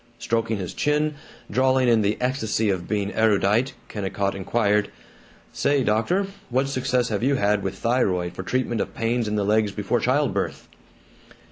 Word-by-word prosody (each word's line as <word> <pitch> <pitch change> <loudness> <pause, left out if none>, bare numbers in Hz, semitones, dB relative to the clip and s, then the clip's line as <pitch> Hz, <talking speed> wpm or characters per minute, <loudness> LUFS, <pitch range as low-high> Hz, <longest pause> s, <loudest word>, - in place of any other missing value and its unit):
Stroking 115 -1 -1
his 90 -3 -5
chin, 150 +1 +1 0.4
drawling 130 0 +3
in 115 -2 +4
the 105 +1 +1
ecstasy 115 -4 0
of 90 -2 -3
being 100 -1 -1
erudite, 110 +3 +2
Kennicott 100 -1 -2
inquired, 105 +1 +1 0.6
"Say, 140 -2 +1
doctor, 115 - +1 0.2
what 130 +2 +1
success 130 -2 0
have 105 -2 -1
you 135 +3 +2
had 105 -4 +2
with 95 0 -3
thyroid 95 -8 0
for 90 - -6
treatment 120 +3 -1
of - - -5
pains 115 0 0
in 105 - -1
the 105 -1 0
legs 105 0 +2
before 105 +4 -1
child 140 +3 +1
birth?" - - -3
110 Hz, 160 wpm, -24 LUFS, 100-130 Hz, 0.6 s, in